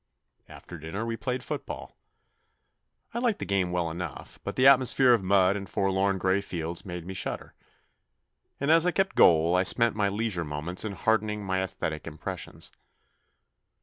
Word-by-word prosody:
After 85 - -11
dinner 80 +9 -5
we 115 0 -3
played 125 +1 -3
football. - - -6 1.2
I 235 - -2
liked 235 -4 +1
the - - -5
game 95 -3 0
well 85 -2 -1
enough, 90 +2 -7
but - - -5
the 130 - +2
atmosphere 130 -1 +6
of 115 - +2
mud 95 0 +3
and 100 -2 -6
forlorn 95 -1 +1
grey 95 +1 +1
fields 85 -3 -5
made 90 -2 -7
me 95 - -6
shudder, 95 - -5 1.1
and 140 +3 +1
as 165 +2 +5
I - - +3
kept 195 0 0
goal 85 +1 +5
I 90 - +4
spent 115 +5 +4
my 100 -2 +1
leisure 100 -3 -2
moments 75 +4 -2
in 110 -2 -4
hardening 105 +1 0
my 95 0 0
aesthetic 80 -5 -4
impressions. 80 -1 -5
95 Hz, 165 wpm, -27 LUFS, 90-115 Hz, 1.2 s, atmosphere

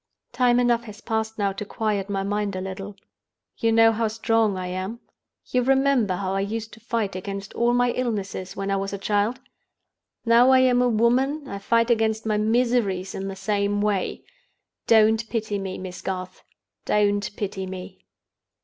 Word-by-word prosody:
"Time 245 0 +3
enough 240 -1 +2
has 210 -2 -10
passed 220 -1 -2
now 200 -2 +1
to 200 - -5
quiet 210 -2 -2
my 195 -1 -1
mind 205 0 -1
a - - -2
little. 195 +1 -6 0.6
You 230 - +2
know 225 0 +6
how 225 0 0
strong 220 -2 +1
I 185 - -4
am? 185 +5 -4 0.5
You 250 - +2
remember 265 -6 +2
how 190 0 -2
I 195 - 0
used 220 +3 -4
to 220 - -12
fight 225 -4 -2
against 195 +1 -6
all 235 +1 +2
my 245 0 +3
illnesses 205 -6 -3
when 195 0 -3
I 195 - +1
was 195 +1 -3
a - - -2
child? 205 +5 0 0.9
Now 235 +2 +6
I 260 - +7
am 250 -1 +4
a 250 - +3
woman, 255 +6 +1
I 200 -5 -5
fight 230 +3 +2
against 220 -1 +1
my 215 -1 +1
miseries 220 -4 +1
in 195 0 -4
the 195 - -5
same 205 0 0
way. 205 -2 -1 0.6
Don't 220 0 +4
pity 215 -3 -2
me, 190 -1 -5
Miss 185 -1 -7
Garth! 185 -1 -5 0.4
Don't 205 -1 +1
pity 190 -2 -4
me! 185 0 -8
215 Hz, 175 wpm, -24 LUFS, 195-230 Hz, 0.9 s, I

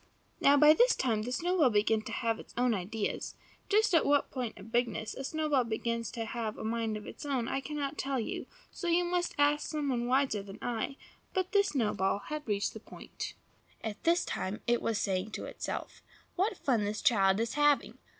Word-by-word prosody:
Now, 280 +1 +6
by 300 +1 +8
this 485 +8 +5
time 225 -5 0
the 240 +3 -4
snowball 335 0 +3
began 215 0 +2
to - - -8
have 230 -2 -1
its - - -13
own 245 -1 +3
ideas. 205 +2 -3 0.3
Just 425 -1 +3
at 330 - +5
what 285 0 +2
point 250 -4 -4
of 210 +3 -11
bigness 235 -2 0
a 270 - -6
snowball 300 -2 +1
begins 230 0 -2
to 230 -1 -3
have 225 -1 -4
a - - -6
mind 225 -1 -1
of 210 - -9
its - - -9
own 265 -5 -1
I 270 - -1
cannot 290 0 -4
tell 270 -1 -1
you, 225 - -4 0.2
so 350 - -5
you 345 +1 +3
must 350 0 -1
ask 290 +1 +2
some 300 -2 -1
one 240 -2 0
wiser 255 -5 +2
than 195 0 -10
I; 245 +3 -3 0.4
but 370 0 0
this 405 -1 +4
snowball 210 -7 +1
had 300 +7 -6
reached 205 -1 0
the - - -8
point. - - -8 0.5
At 220 -2 -5
this 340 +1 +3
moment 190 +3 -4
it 240 0 +2
was 225 -2 0
saying 195 +1 -1
to - - -4
itself, - - -5 0.3
"What 390 +6 0
fun 250 -9 +1
this 210 +1 -3
child 195 -3 +4
is 230 0 -1
having! 295 -1 +2
245 Hz, 205 wpm, -31 LUFS, 220-295 Hz, 0.5 s, by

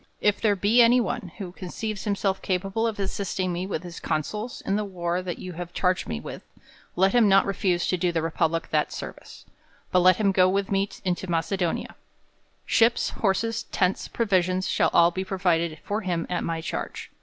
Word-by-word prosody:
If 210 -1 +1
there 210 -2 +3
be 210 +5 +4
any 240 +2 +6
one, 220 -5 -3
who 185 -3 -6
conceives 200 +3 -5
himself 200 -2 0
capable 195 +4 -1
of 225 - -3
assisting 190 -2 -2
me 180 +2 -3
with 195 - -3
his 175 -1 -8
counsels 210 +10 -3
in 195 - -1
the 210 - 0
war 175 -3 -2
you 185 0 -5
have 175 +1 -7
charged 180 -1 +1
me 75 - -3
with, - - -8 0.5
let 190 +2 +3
him 235 -4 +5
not 195 0 +5
refuse 185 -3 0
to 185 - +1
do 175 0 +1
the 165 -2 -1
republic 165 0 0
that 150 -1 +1
service; - - -9 0.5
but 180 - +4
let 185 0 +6
him 205 -2 +2
go 185 -1 +4
with 195 +1 -1
me 195 +1 +1 0.2
into 185 +1 -1
Macedo 175 +1 0
nia. - - -6 0.7
Ships, 230 0 +3
horses, 225 +3 0
tents, 185 0 0
provisions., 185 -4 +1
shall - - +2
all 170 0 +5
be 190 +2 -3
pro 190 0 -4
vided 170 -3 +1
for 210 +2 -2
him 175 -4 -1
at 180 - -1
my 165 -1 -2
charge. - - -5
185 Hz, 195 wpm, -25 LUFS, 175-200 Hz, 0.7 s, any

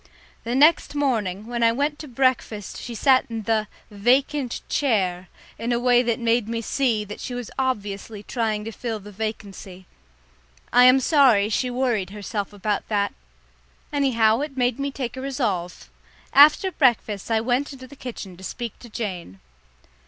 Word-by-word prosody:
The 235 +2 -1
next 300 +2 +4
morning, 215 -9 -1
when 240 0 -4
I 230 0 +5
went 285 +6 0
in 295 - -24
to 305 - -9
breakfast 240 -6 0
she 240 - -7
sat 260 +2 +3
in 225 -1 -4
the 215 0 0 0.2
"vacant 255 +5 +1
chair" 190 -9 0 0.3
in 235 +1 -2
a 240 - +1
way 245 0 +4
that 235 -2 0
made 230 -1 +1
me 230 0 -2
see 230 -2 0
that 205 0 -8
she 245 - -5
was 245 -3 -6
obviously 210 -4 -3
trying 215 -2 -2
to 225 - -5
fill 225 -1 -4
the 210 +1 -12
vacancy. 195 -3 -6 0.9
I 245 +1 +7
am 255 +1 +7
sorry 255 -8 +4
she 250 +3 0
worried 245 -6 -1
herself 205 0 -5
about 205 0 -2
that. 205 -2 0 0.8
Anyhow, 230 -6 +3
it 285 -2 -5
made 245 0 +1
me 280 0 -1
take 265 -3 -5
a 260 - -6
resolve. 220 -11 -3 0.4
After 300 +7 +6
breakfast, 235 - +1
I 225 -1 +2
went 250 +5 0
into 260 -2 -10
the 285 - -14
kitchen 225 -8 -8
to 190 - -13
speak 235 +3 -6
to 240 - -12
Jane. 185 - -5
235 Hz, 170 wpm, -23 LUFS, 210-260 Hz, 0.9 s, I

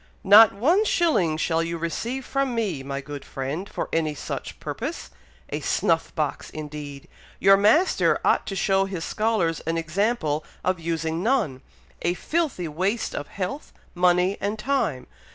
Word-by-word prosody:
"Not 210 +3 +9
one 315 - +3
shilling 305 - +2
shall 165 0 +1
you 170 0 -3
receive 230 +11 -3
from 275 -3 -1
me, 200 -11 -1
my 140 +1 -4
good 145 0 -8
friend, 140 +9 -5
for - - -4
any 155 -2 0
such - - -6
purpose! - - -5 0.4
a - - -3
snuff - - +1
box, - - -2
indeed! 150 -2 -8 0.3
your 195 +1 +7
master 220 - +3
ought - - +2
to 195 - -3
show 195 0 +2
his 185 -4 -4
scholars 215 -7 0
an 165 0 0
example 165 -2 0 0.2
of 185 -1 0
using 165 0 -2
none! 205 - 0 0.4
a 175 +1 0
filthy 305 - -1
waste 190 +9 -1
of 145 - -4
health, 230 +10 -5 0.2
money, 180 +2 +2
and 205 +2 -1
time. 215 - -1
180 Hz, 150 wpm, -24 LUFS, 160-220 Hz, 0.4 s, Not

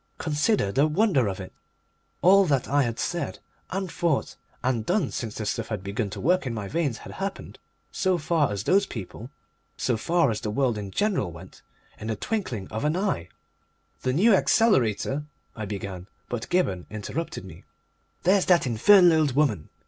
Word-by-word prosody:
Consider 155 - +1
the 140 +7 +3
wonder 155 - +2
of 95 -1 -3
it! 95 - -8 0.7
All 195 +2 +7
that 140 -6 +1
I 145 +2 +3
had 120 -3 -1
said, 170 0 -2 0.3
and 190 -2 -3
thought, 165 -5 0 0.3
and 125 -3 0
done 160 - 0
since 110 -3 -4
the 110 - -4
stuff 110 +2 -2
had 105 -4 -4
begun 100 +2 -2
to - - -7
work 180 -1 +2
in 115 - -3
my 105 -2 -4
veins 145 -3 -1
had - - -10
happened, 195 0 -6 0.3
so 185 -2 +1
far 155 -4 +1
as 100 -2 -3
those 195 +1 +3
people, 110 - -8 0.5
so 120 -3 0
far 165 +4 +2
as 105 - -3
the 105 - -3
world 120 +1 +1
in 100 -1 -6
general 195 - 0
went, 85 +3 -13 0.4
in 110 - -6
the 110 - -1
twinkling 125 - -3
of 110 - -4
an 150 +2 +1
eye. 185 - -1 0.7
"The 130 - 0
New 205 - +5
Accelerator 145 - +2 0.2
" - - -42
I 110 - -4
began, 95 -2 -6 0.2
but 120 -2 -4
Gibberne 100 - 0
interrupted 110 - -5
me. 95 - -12 0.6
"There's 190 +2 +4
that 175 -5 +4
infernal 165 - +6
old 145 -5 +1
woman!" 130 - +1
135 Hz, 180 wpm, -26 LUFS, 105-175 Hz, 0.7 s, All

